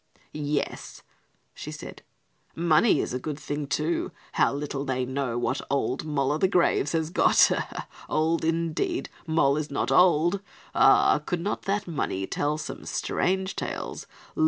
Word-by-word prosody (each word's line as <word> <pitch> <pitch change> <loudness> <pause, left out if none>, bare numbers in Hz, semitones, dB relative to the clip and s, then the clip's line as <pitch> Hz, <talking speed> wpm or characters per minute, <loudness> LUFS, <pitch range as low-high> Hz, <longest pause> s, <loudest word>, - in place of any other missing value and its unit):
"Yes," 150 -1 -3 0.5
she - - -8
said, - - -9 0.5
"money 170 +6 +4
is - - -4
a 125 - -1
good 150 +2 -4
thing, 145 -1 -4
too. 155 +5 -1 0.2
How - - +3
little 140 -1 -3
they 130 -2 -1
know 130 -2 -2
what 120 +2 -1
'old 140 0 -1
Moll 140 -3 0
o' 150 - +1
the 190 - +4
graves' 175 -5 +2
has 160 -1 0
got, - - +5 0.6
old, 160 +2 +1
indeed, 165 - -1 0.2
Moll 150 -3 +3
is 155 -1 -3
not 140 -2 -1
old! 175 +4 +4 0.3
Ah, - - +5
could 180 - -2
not 205 +4 -2
that 200 0 -1
money 140 - -2
tell 145 +8 -1
some 150 - -6
strange 190 +1 -1
tales? - - -5
150 Hz, 150 wpm, -26 LUFS, 140-170 Hz, 0.6 s, got